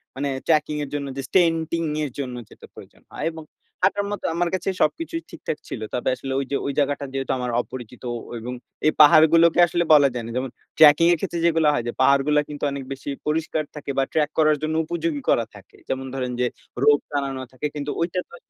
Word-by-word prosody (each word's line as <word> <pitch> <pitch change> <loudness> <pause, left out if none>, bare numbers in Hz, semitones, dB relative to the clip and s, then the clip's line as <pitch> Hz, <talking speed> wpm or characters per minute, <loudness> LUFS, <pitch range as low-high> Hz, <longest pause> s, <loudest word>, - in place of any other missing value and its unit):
মানে 140 +2 -2 0.2
ট্র্যাকিং 150 -1 +2
এর 140 - -6
জন্য 145 -1 -3
যে - - -2
স্ট্যান্টিং 165 -2 +2 0.2
এর 145 - -3
জন্য 130 -3 -4
যেটা - - -14
প্রয়োজন - - -15
হয় - - -5
এবং 160 0 -9 0.4
হাঁটার 200 +2 +2
মতো 205 - -5
আমার 175 0 +1
কাছে 185 0 -1
সবকিছুই 330 - 0
ঠিকঠাক 150 - -5
ছিল। - - -5
তবে 125 - 0
আসলে 135 0 -5
ওইযে 140 +1 -3
ওই 140 - -1
জায়গাটা 145 0 0
যেহেতু 135 -1 -2
আমার 125 -1 -2
অপরিচিত 125 -1 -10 0.4
এবং 120 +3 -6 0.3
এই 155 - +5
পাহাড়গুলোকে 160 +3 +6
আসলে 170 +1 0
বলা 145 -2 +7
যায় 120 -1 -4
না। 115 - -6
যেমন 130 +1 -2 0.3
ট্র্যাকিং 155 +1 +7
এর 175 - +3
ক্ষেত্রে 175 -2 -3
যেগুলা 165 -2 +3
হয় 120 - -1
যে - - -1
পাহাড়গুলা 140 +2 +4
কিন্তু 145 -1 -8
অনেক 140 -1 -5
বেশি 135 +1 -6 0.2
পরিষ্কার 155 0 0
থাকে 145 -1 -8
বা 135 - +4
ট্রাক 155 -2 +1
করার 155 -1 +4
জন্য 155 0 -1
উপযোগী 165 -3 -2
করা 115 - +3
থাকে। 100 -1 -16
যেমন 135 0 -2
ধরেন 125 -2 -2
যে 125 - +2 0.4
রোপ 145 0 +6
টানানো 140 -2 -2
থাকে 130 +3 -3
কিন্তু 145 0 -3
ঐটা 175 +2 -1
তো 470 - -12
150 Hz, 205 wpm, -23 LUFS, 135-165 Hz, 0.4 s, বলা